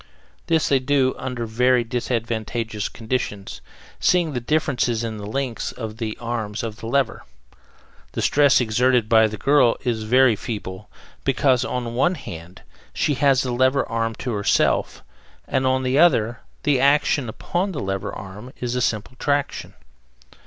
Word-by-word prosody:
This 165 Hz, -2 st, +2 dB
they 135 Hz, -, +3 dB
do 130 Hz, 0 st, +2 dB
under 125 Hz, -3 st, -4 dB
very 125 Hz, +2 st, +2 dB
disadvantageous 115 Hz, -2 st, -3 dB
conditions, 110 Hz, -4 st, -4 dB, 0.4 s
seeing 175 Hz, -4 st, +2 dB
the 125 Hz, -, -1 dB
difference 140 Hz, 0 st, 0 dB
in 115 Hz, -1 st, -2 dB
the 100 Hz, -1 st, -7 dB
length 125 Hz, +1 st, -3 dB
of 110 Hz, -3 st, -7 dB
the 110 Hz, -2 st, -4 dB
arms 115 Hz, -3 st, -3 dB
of 110 Hz, -2 st, -5 dB
the 115 Hz, -, -8 dB
lever. 130 Hz, 0 st, 0 dB, 0.9 s
The -, -, -2 dB
stress 145 Hz, -2 st, +4 dB
exerted 125 Hz, 0 st, +2 dB
by 110 Hz, -1 st, +5 dB
the 110 Hz, 0 st, -6 dB
girl 135 Hz, +1 st, +3 dB
is 120 Hz, -4 st, -1 dB
very 120 Hz, +2 st, +4 dB
feeble, 105 Hz, -3 st, -6 dB, 0.3 s
because, 130 Hz, -2 st, +2 dB
on 125 Hz, -, -2 dB
the 115 Hz, -, -5 dB
one 155 Hz, +10 st, +1 dB
hand, 85 Hz, -, -10 dB, 0.3 s
she 150 Hz, -, +1 dB
has 135 Hz, -1 st, +3 dB
the 125 Hz, -, -2 dB
lever 130 Hz, +3 st, +2 dB
arm 115 Hz, 0 st, -2 dB
to 125 Hz, -, -4 dB
herself, 100 Hz, -1 st, +1 dB, 0.4 s
and, 130 Hz, -, 0 dB
on 130 Hz, 0 st, +1 dB
the 130 Hz, +2 st, +1 dB
other, 120 Hz, -9 st, +3 dB, 0.2 s
the 145 Hz, -3 st, +2 dB
action 140 Hz, -2 st, +2 dB
upon 175 Hz, -, -2 dB
her 155 Hz, -, -4 dB
lever 95 Hz, +1 st, -3 dB
arm 100 Hz, +6 st, -9 dB
is 125 Hz, -1 st, -3 dB
a 125 Hz, -, -1 dB
simple 110 Hz, +2 st, -2 dB
traction. 145 Hz, -1 st, -1 dB
120 Hz, 160 wpm, -22 LUFS, 110-135 Hz, 0.9 s, by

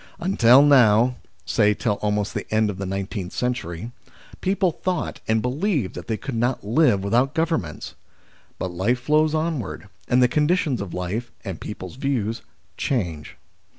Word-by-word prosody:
Until 135 Hz, -8 st, +5 dB
now, 125 Hz, -3 st, +5 dB, 0.3 s
say 105 Hz, +4 st, +3 dB
till 105 Hz, -3 st, -1 dB
almost 105 Hz, -1 st, -1 dB
the -, -, -5 dB
end 110 Hz, -1 st, +2 dB
of 95 Hz, -, -9 dB
the 100 Hz, -, -3 dB
nineteenth 95 Hz, 0 st, -4 dB
century, 120 Hz, -4 st, -3 dB, 0.5 s
people 190 Hz, -1 st, +1 dB
thought 180 Hz, +2 st, -3 dB
and 110 Hz, 0 st, +1 dB
believed 140 Hz, -, -1 dB
that -, -, -8 dB
they 110 Hz, -, -1 dB
could 135 Hz, +3 st, -6 dB
not 120 Hz, +2 st, 0 dB
live 110 Hz, -4 st, +3 dB
without 120 Hz, +7 st, +1 dB
Governments. 160 Hz, -, -2 dB, 0.6 s
But 95 Hz, -, -3 dB
life 100 Hz, +8 st, 0 dB
flows 155 Hz, +3 st, +2 dB
onward, 155 Hz, -, -3 dB, 0.2 s
and 125 Hz, -, +3 dB
the 125 Hz, -, +6 dB
conditions 150 Hz, -, +1 dB
of 100 Hz, -3 st, -6 dB
life, 100 Hz, +7 st, -3 dB
and 95 Hz, -4 st, -6 dB
people's 105 Hz, +1 st, -7 dB
views, 120 Hz, -5 st, -1 dB, 0.4 s
change. 85 Hz, -, -2 dB
120 Hz, 150 wpm, -23 LUFS, 100-145 Hz, 0.6 s, the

